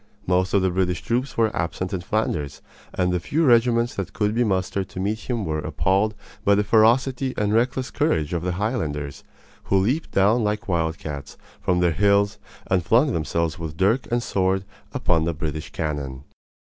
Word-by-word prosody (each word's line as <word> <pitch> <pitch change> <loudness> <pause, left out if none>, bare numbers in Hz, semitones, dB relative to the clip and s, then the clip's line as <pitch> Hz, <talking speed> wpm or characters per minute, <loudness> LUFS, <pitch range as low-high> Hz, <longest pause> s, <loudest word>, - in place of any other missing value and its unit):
Most 95 +2 +1
of 95 - +3
the 95 - +2
British 90 -2 0
troops 125 +4 -1
were 110 -2 +2
absent 85 +3 -2
in 95 - -2
Flanders, 85 -7 -2 0.3
and 90 0 0
the 90 - +1
few 155 - 0
regiments 120 -1 +4
that 95 -4 -5
could 105 0 0
be 120 +2 +2
mustered 95 -2 -1
to - - -7
meet 105 +5 -3
him 120 -4 -1
were 80 -1 -1
appalled 95 +7 0 0.3
by 100 - +4
the 105 - +2
ferocity 125 +5 +3
and 105 0 +1
reckless 125 +3 +1
courage 90 - 0
of 85 - -1
the 90 +1 -1
Highlanders, 80 - -3 0.4
who 100 - +2
leaped 125 +12 +1
down 105 +5 +3
like 105 0 -1
wildcats 80 -5 -3 0.2
from 90 -1 +1
their 85 -1 +3
hills 100 +3 +2 0.3
and 95 -2 +1
flung 120 - +3
themselves 80 0 -1
with 80 -1 -6
dirk 110 +8 +2
and 120 0 +1
sword 95 -2 0 0.3
upon 80 -3 +1
the 85 -1 -1
British 75 0 -4
cannon. 70 -4 -4
95 Hz, 180 wpm, -23 LUFS, 85-110 Hz, 0.4 s, regiments